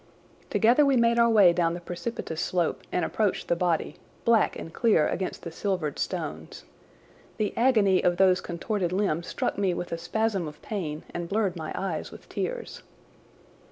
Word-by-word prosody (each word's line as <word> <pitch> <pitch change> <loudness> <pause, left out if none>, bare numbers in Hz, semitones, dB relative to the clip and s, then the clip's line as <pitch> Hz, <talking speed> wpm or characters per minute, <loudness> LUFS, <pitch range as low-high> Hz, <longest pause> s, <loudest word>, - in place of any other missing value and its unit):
Together 240 +6 +4
we 275 -2 +3
made 235 0 +3
our 235 0 +5
way 200 -6 +6
down 170 -1 +1
the - - -5
precipitous 175 -1 -5
slope 175 -2 0
and 180 - 0
approached 210 -4 -1
the 170 - +2
body, 170 -2 -1 0.3
black 230 -3 +3
and 165 - -8
clear 215 -10 +3
against 185 +1 -3
the 170 - -6
silvered 180 -4 -2
stones. - - -4 0.7
The 215 -2 -1
agony 220 -6 +3
of 175 0 +2
those 185 -1 +4
contorted 175 +1 -2
limbs 180 -3 0
struck - - -2
me 190 -3 +1
with 175 - -5
a 165 - -3
spasm 195 +1 -1
of 150 0 -10
pain 160 -8 -4
and 175 -1 -4
blurred 200 -3 0
my 160 -2 -5
eyes 185 -5 -3
with - - -13
tears. - - -4
185 Hz, 170 wpm, -27 LUFS, 170-220 Hz, 0.7 s, way